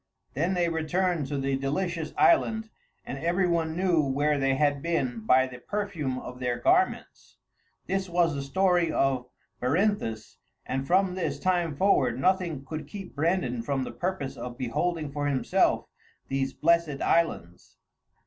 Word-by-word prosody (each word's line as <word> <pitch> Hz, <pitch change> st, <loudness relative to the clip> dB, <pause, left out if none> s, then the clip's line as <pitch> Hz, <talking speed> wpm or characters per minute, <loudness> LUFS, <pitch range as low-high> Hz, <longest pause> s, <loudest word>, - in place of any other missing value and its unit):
Then 170 Hz, +7 st, 0 dB
they 175 Hz, -1 st, +2 dB
returned 165 Hz, -1 st, 0 dB
to 145 Hz, -, -3 dB
the 135 Hz, 0 st, 0 dB
Delicious 160 Hz, +4 st, -2 dB
Island, 220 Hz, -9 st, +3 dB, 0.3 s
and 135 Hz, -, -5 dB
every 175 Hz, +4 st, +1 dB
one 165 Hz, -2 st, 0 dB
knew 180 Hz, -3 st, +2 dB
where 145 Hz, +1 st, +1 dB
they 135 Hz, 0 st, +2 dB
had 145 Hz, 0 st, +1 dB
been 170 Hz, -, -1 dB
by 130 Hz, 0 st, +5 dB
the 125 Hz, -1 st, -9 dB
perfume 165 Hz, -7 st, -3 dB
of 125 Hz, 0 st, -8 dB
their 125 Hz, -1 st, -1 dB
garments. 370 Hz, +2 st, 0 dB, 0.5 s
This 190 Hz, 0 st, -2 dB
was 170 Hz, -2 st, +2 dB
the 140 Hz, -, -3 dB
story 175 Hz, +4 st, +2 dB
of 130 Hz, -4 st, +1 dB, 0.3 s
Berinthus, 135 Hz, -, -1 dB, 0.3 s
and 135 Hz, +1 st, -3 dB
from 185 Hz, +1 st, +3 dB
this 185 Hz, -1 st, -2 dB
time 175 Hz, -4 st, 0 dB
forward 130 Hz, -9 st, +2 dB
nothing 170 Hz, -3 st, 0 dB
could 155 Hz, 0 st, -6 dB
keep 195 Hz, +2 st, -8 dB
Brandan 150 Hz, -6 st, 0 dB
from 135 Hz, +2 st, -1 dB
the -, -, -5 dB
purpose 175 Hz, -8 st, -3 dB
of 120 Hz, 0 st, -7 dB
beholding 150 Hz, +5 st, -2 dB
for 145 Hz, 0 st, -2 dB
himself 135 Hz, -2 st, +1 dB, 0.4 s
these 135 Hz, 0 st, -1 dB
blessed 165 Hz, -3 st, +1 dB
islands. 90 Hz, -, -1 dB
155 Hz, 150 wpm, -27 LUFS, 135-180 Hz, 0.5 s, by